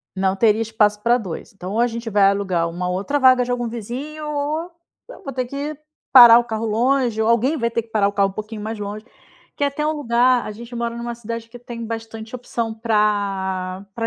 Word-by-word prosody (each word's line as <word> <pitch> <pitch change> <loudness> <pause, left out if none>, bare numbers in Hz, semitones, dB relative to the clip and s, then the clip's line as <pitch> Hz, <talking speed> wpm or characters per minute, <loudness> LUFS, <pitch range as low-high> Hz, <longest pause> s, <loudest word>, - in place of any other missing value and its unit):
Não 190 0 0
teria 220 0 +3
espaço 215 -2 +1
pra 235 +1 +4
2, 195 -8 -6
então, 190 0 -7
ou 225 - 0
a 240 - +4
gente 230 -1 -5
vai 205 -1 +4
alugar 190 -4 +1
uma 180 +2 -4
outra 195 +11 -1
vaga 255 -2 +5
de 245 - -6
algum 245 -1 -1
vizinho 260 +7 -6
ou 300 +4 -2 0.4
eu - - -12
vou 275 - -5
ter 255 -1 -2
que 285 +4 -4 0.4
parar 240 -3 +10
o 240 - 0
carro 225 -1 -3
longe 235 +1 +1
ou 220 - +1
alguém 245 +7 +2
vai 235 -3 -1
ter 230 - 0
que 230 - -23
parar 210 -3 +2
o - - -4
carro 200 -1 +2
um - - -8
pouquinho 215 +1 -7
mais 220 +1 -5
longe 210 +2 -6 0.5
quer 285 0 +1
ter 300 0 -1
um 310 - +1
lugar 250 -3 +2
a - - -5
gente 235 +3 -10
mora 235 0 -3
numa 235 0 -4
cidade 230 0 -6
que 245 +1 -11
tem 235 -1 -7
bastante 225 0 -7
opção 230 -2 -4
pra 200 -4 -1
pra 230 -1 -2
230 Hz, 225 wpm, -21 LUFS, 210-245 Hz, 0.5 s, parar